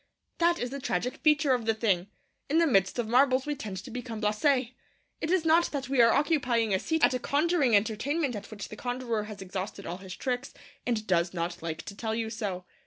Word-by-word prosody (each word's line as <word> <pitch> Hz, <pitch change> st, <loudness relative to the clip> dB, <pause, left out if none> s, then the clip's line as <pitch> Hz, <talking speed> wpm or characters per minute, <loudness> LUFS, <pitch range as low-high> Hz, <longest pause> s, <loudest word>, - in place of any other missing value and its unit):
That 340 Hz, 0 st, +3 dB
is 245 Hz, -4 st, -3 dB
the 280 Hz, -, -4 dB
tragic 250 Hz, -2 st, -2 dB
feature 300 Hz, -3 st, +3 dB
of 240 Hz, -3 st, -1 dB
the 225 Hz, -, +3 dB
thing. 200 Hz, -5 st, +1 dB, 0.4 s
In 305 Hz, -, +2 dB
the 335 Hz, -, +5 dB
midst 195 Hz, -, +2 dB
of 240 Hz, -2 st, -1 dB
marvels 255 Hz, +2 st, +4 dB
we 295 Hz, -, -1 dB
tend 215 Hz, -9 st, -6 dB
to -, -, -9 dB
become 245 Hz, -2 st, -5 dB
blasé. 235 Hz, +4 st, +1 dB, 0.5 s
It 315 Hz, -, -2 dB
is 360 Hz, -2 st, +2 dB
not 330 Hz, +2 st, +5 dB
that 270 Hz, -3 st, -4 dB
we 270 Hz, -3 st, +4 dB
are 230 Hz, 0 st, +6 dB
occupying 250 Hz, -, +2 dB
a 190 Hz, -, +2 dB
seat 320 Hz, +7 st, -1 dB
at -, -, +1 dB
a 255 Hz, -, 0 dB
conjuring 290 Hz, -3 st, +2 dB
entertainment 245 Hz, +7 st, 0 dB
at 205 Hz, 0 st, -7 dB
which 210 Hz, -2 st, -7 dB
the -, -, -8 dB
conjurer 245 Hz, -2 st, -2 dB
has 210 Hz, -2 st, -8 dB
exhausted 190 Hz, +1 st, -5 dB
all 175 Hz, -, -4 dB
his 190 Hz, -1 st, -9 dB
tricks, 255 Hz, +1 st, -3 dB, 0.3 s
and 225 Hz, -3 st, 0 dB
does 175 Hz, -2 st, +1 dB
not 170 Hz, +1 st, -3 dB
like 160 Hz, -1 st, -4 dB
to 200 Hz, -, -8 dB
tell 220 Hz, +1 st, -2 dB
you 225 Hz, -1 st, -2 dB
so. 200 Hz, -6 st, -4 dB
235 Hz, 225 wpm, -29 LUFS, 205-280 Hz, 0.5 s, are